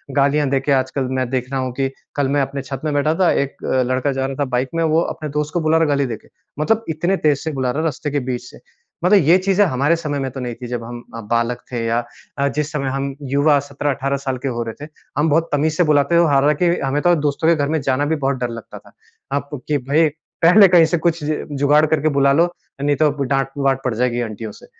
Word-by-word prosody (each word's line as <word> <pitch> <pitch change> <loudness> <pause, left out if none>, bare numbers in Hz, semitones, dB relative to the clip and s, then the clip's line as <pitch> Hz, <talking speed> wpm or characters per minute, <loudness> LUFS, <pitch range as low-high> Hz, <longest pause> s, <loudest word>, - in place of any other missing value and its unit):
गालियाँ 145 +1 +2
दे 135 0 +2
के 135 +2 -2
आजकल 130 0 +1
मैं 130 -2 -1
देख 130 -1 -2
रहा 135 - -1
हूँ 130 -1 -3
कि 135 +1 -1 0.3
कल 145 -2 +1
मैं 145 - +3
अपने 135 +1 -3
छत 135 0 -7
में 150 - 0
बैठा 145 +2 +2
था 180 0 +3
एक 140 0 -2
अ, 130 -1 +1
लड़का 130 +3 0
जा 135 0 -2
रहा 135 0 -4
था 145 - -1
बाइक 125 +1 -1
में 165 - +1
वो 160 0 +3
अपने 155 -2 -4
दोस्त 150 +1 -3
को 175 - +1
बुला 155 +1 +3
रहा 165 - +3
है 155 - +1
गाली 140 - +1
देके। 115 -4 -7 0.3
मतलब 225 +9 +1
इतने 175 +5 0
तेज 150 -5 +2
से 160 - -2
बुला 130 -3 -1
रहा 140 - -3
है 160 - -1
रास्ते 150 -1 -3
के 145 - 0
बीच 125 -2 -3
से। - - -15 0.5
मतलब 200 +3 +6
ये 170 +5 +6
चीज़ें 195 +2 +2
हमारे 145 0 +1
समय 150 -4 -3
में 135 -1 -2
तो 135 - -7
नहीं 120 -2 -4
थी 125 - -8
जब 120 -1 -4
हम 120 +1 -8
अ, 115 - -5
बालक 115 +2 -1
थे 120 -2 -2
या 115 +1 0 0.3
अ, 140 - +1
जिस 150 +2 -2
समय 140 -3 -2
हम 135 0 -3 0.2
युवा 145 +1 +4
17-18 140 0 -2
साल 135 -2 -3
के - - +1
हो 120 -2 -2
रहे 115 +6 -7
थे। - - -14 0.3
हम 150 +2 +2
बहुत 165 +3 +2
तमीज़ 150 +2 +1
से 180 - +4
बुलाते 150 0 +2
थे। 170 0 +5
हालाँकि 150 +5 +3
हमें 135 +2 0
तो 175 +1 +4
दोस्तों 145 +3 -1
के 170 - +5
घर 145 -2 0
में 160 0 +1
जाना 135 +1 0
भी 160 +2 0
बहुत 140 -2 -1
डर 120 -1 -2
लगता 115 -1 -9
था। - - -20 0.5
अब 145 0 -6
कि 150 - +1
भई 155 +3 +4 0.4
पहले 195 +4 +8
कहीं 175 -2 +6
से 175 +2 0
कुछ 165 -1 0
ज 150 +1 -2
जुगाड़ 145 +2 +3
करके 155 0 +1
बुला 140 0 +4
लो, 165 +4 +4 0.4
नहीं 145 0 +2
तो 155 -1 +4
डाँट-वाँट 135 0 0
पड़ 130 - -1
जाएगी 120 +1 0
आंटियों 110 -1 -5
से। - - -15
140 Hz, 260 wpm, -19 LUFS, 130-155 Hz, 0.5 s, पहले